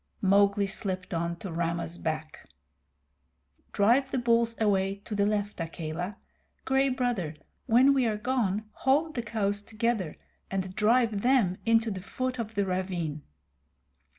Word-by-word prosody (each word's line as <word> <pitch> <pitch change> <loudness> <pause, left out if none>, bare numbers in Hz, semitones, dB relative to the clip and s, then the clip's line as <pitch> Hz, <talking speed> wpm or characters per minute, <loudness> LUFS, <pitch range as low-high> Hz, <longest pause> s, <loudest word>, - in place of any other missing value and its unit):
Mowgli 200 +1 +4
slipped 190 -2 -3
on 170 +1 -1
to 180 +1 -7
Rama's 170 0 -2
back. 155 -1 -4 1.2
"Drive 240 +7 +3
the 265 - -1
bulls 235 -1 +2
away 195 -3 +2
to 220 - -6
the 205 0 +2
left, 205 -1 -1
Akela. 165 +3 -4 0.5
Gray 270 +1 +3
Brother, 245 - -1 0.3
when 255 +4 +6
we 260 -3 +2
are 215 -1 0
gone, 215 -3 0
hold 295 +5 +1
the 240 - -2
cows 205 -2 -1
together, 220 -5 -2 0.3
and 190 -1 -3
drive 225 -1 +3
them 240 -8 +3
into 225 0 +3
the 190 -2 -5
foot 255 +6 -3
of 220 -1 -4
the 200 -1 +1
ravine." 180 -5 -2
205 Hz, 140 wpm, -28 LUFS, 185-235 Hz, 1.2 s, when